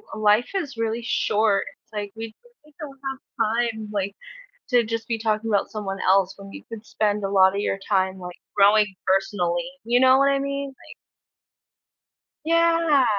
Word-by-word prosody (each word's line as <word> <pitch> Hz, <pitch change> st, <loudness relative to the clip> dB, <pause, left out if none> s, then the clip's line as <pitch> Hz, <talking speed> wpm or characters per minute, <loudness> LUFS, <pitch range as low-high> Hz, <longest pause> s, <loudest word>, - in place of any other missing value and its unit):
life 215 Hz, +2 st, +3 dB
is 305 Hz, -10 st, -3 dB
really 230 Hz, +1 st, -2 dB
short. 215 Hz, -2 st, +1 dB, 0.2 s
It's 225 Hz, -, -37 dB
like, 205 Hz, -1 st, -4 dB
we 225 Hz, 0 st, -7 dB, 0.3 s
we 300 Hz, -, -21 dB
don't 275 Hz, -3 st, -9 dB
have 265 Hz, 0 st, -6 dB, 0.5 s
time, 220 Hz, -1 st, -8 dB
like, 200 Hz, 0 st, -2 dB, 0.6 s
to 240 Hz, -2 st, +4 dB
just 230 Hz, +1 st, -4 dB
be 230 Hz, -1 st, -1 dB
talking 220 Hz, 0 st, -1 dB
about 200 Hz, -, +1 dB
someone 195 Hz, -3 st, -4 dB
else 190 Hz, 0 st, +3 dB
when 195 Hz, 0 st, -11 dB
you 290 Hz, -, -9 dB
could 225 Hz, -1 st, -9 dB
spend 210 Hz, -1 st, -1 dB
a 195 Hz, -, -1 dB
lotta 190 Hz, 0 st, +4 dB
your 195 Hz, -, -1 dB
time, 190 Hz, -1 st, +1 dB
like, 180 Hz, -1 st, -8 dB, 0.2 s
growing 205 Hz, 0 st, +4 dB
personally, 190 Hz, +2 st, 0 dB
you 240 Hz, +2 st, +3 dB
know 260 Hz, 0 st, +6 dB
what 275 Hz, 0 st, +4 dB
I 275 Hz, -, +2 dB
mean? 280 Hz, 0 st, -3 dB
Like 270 Hz, -, -15 dB, 1.5 s
Yeah, 330 Hz, -4 st, +3 dB
215 Hz, 170 wpm, -23 LUFS, 200-260 Hz, 1.5 s, know